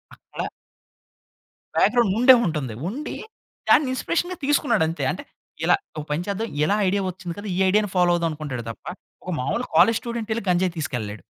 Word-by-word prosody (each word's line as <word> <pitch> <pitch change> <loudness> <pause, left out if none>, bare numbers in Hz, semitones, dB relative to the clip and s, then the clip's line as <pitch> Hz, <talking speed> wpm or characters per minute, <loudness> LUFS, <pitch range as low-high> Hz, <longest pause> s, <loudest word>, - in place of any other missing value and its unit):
అక్కడ - - -6 1.3
బ్యాగ్రౌండ్ 235 -6 +3
ఉండే 255 +2 +8
ఉంటుంది. 150 -9 -2
ఉండి 275 +10 -5 0.5
దాన్ని 290 - +5
ఇన్‌స్పిరేషన్‌గా 350 +7 -1
తీసుకున్నాడు 240 - +2
అంతే. 165 - -3
అంటే - - -5 0.4
ఇలా - - +5 0.2
ఒక 150 - -4
పని 150 +3 0
చేద్దాం, 205 +3 -2 0.2
ఇలా 200 +6 +2
ఐడియా 200 +1 +1
వచ్చింది 175 -1 -7
కదా! 205 +1 -6
ఈ - - -1
ఐడియాని 210 +1 +2
ఫాలో 180 -1 +4
అవుదాం 170 -1 +1
అనుకుంటాడు 145 -6 -5
తప్ప. 115 - -11 0.4
ఒక 180 - -4
మామూలు 140 - -1
కాలేజ్ 230 -1 +6
స్టూడెంట్ 235 -2 -5
వెళ్లి 220 -1 -2
గంజాయి 180 0 +1
తీసుకెళ్ళలేడు. 110 - -4
185 Hz, 165 wpm, -23 LUFS, 155-230 Hz, 1.3 s, ఉండే